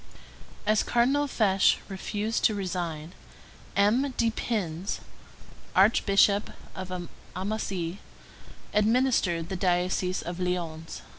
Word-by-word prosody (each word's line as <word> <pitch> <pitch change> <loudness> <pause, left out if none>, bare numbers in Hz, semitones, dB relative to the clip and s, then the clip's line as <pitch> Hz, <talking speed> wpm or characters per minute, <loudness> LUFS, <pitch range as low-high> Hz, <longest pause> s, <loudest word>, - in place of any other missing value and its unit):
As 215 0 +3
Cardinal 270 +5 +2
Fesch 195 -7 +3
refused 210 +3 -2
to 215 - +3
resign, 175 -4 -4 0.6
M. 245 +7 +2
de 230 -1 +2
Pins, 195 -6 -2 0.8
Archbishop 200 0 +4 0.3
of 185 -2 -5 0.3
Amasie, 190 -2 -3 0.7
administered 210 -7 +2
the 190 - -3
diocese 180 0 0
of 175 +1 -5
Lyons. 170 -3 -3
195 Hz, 90 wpm, -27 LUFS, 180-215 Hz, 0.8 s, Archbishop